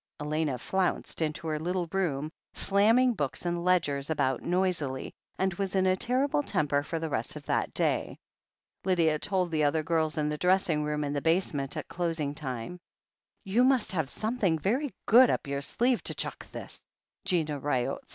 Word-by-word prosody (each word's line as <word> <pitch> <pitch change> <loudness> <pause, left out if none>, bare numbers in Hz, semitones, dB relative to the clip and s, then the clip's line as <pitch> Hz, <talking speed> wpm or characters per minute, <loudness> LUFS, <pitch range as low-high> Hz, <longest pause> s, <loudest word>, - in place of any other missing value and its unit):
Elena 150 -2 -1
flounced 185 +5 -1
into 160 +1 -2
her 155 -1 -1
little 175 +2 -1
room, 155 -6 -1 0.2
slamming 225 +6 +4
books 145 - -3
and 175 0 -1
ledgers 150 -6 +1
about 135 -5 +1
noisily, 175 -7 -1 0.2
and 190 -1 +1
was 195 +1 -3
in 190 -1 +3
a 185 0 +4
terrible 260 +8 +1
temper 145 - +1
for 165 +3 -4
the 160 0 -2
rest 115 -2 -2
of - - -9
that - - 0
day. - - 0 0.7
Lydia 165 -5 +2
told 185 -2 -1
the 155 -2 +1
other 155 +2 +2
girls 160 -1 0
in 150 -1 +1
the 150 0 -2
dressing 180 -4 +2
room 150 0 -1
in 145 0 -2
the 145 - -1
basement 160 -5 0
at - - -4
closing 165 -4 -2
time. 135 +3 -5 0.6
"You 220 +5 +2
must 260 -3 +3
have 160 -7 -1
something 215 -6 0
very 245 - 0
good 245 +3 +7
up - - 0
your 140 0 -2
sleeve 240 - +1
to - - -2
chuck - - -4
this," - - -7 0.5
said - - -4
Gina 155 -6 +1
Ryott. 130 -3 -1
165 Hz, 180 wpm, -29 LUFS, 150-190 Hz, 0.7 s, good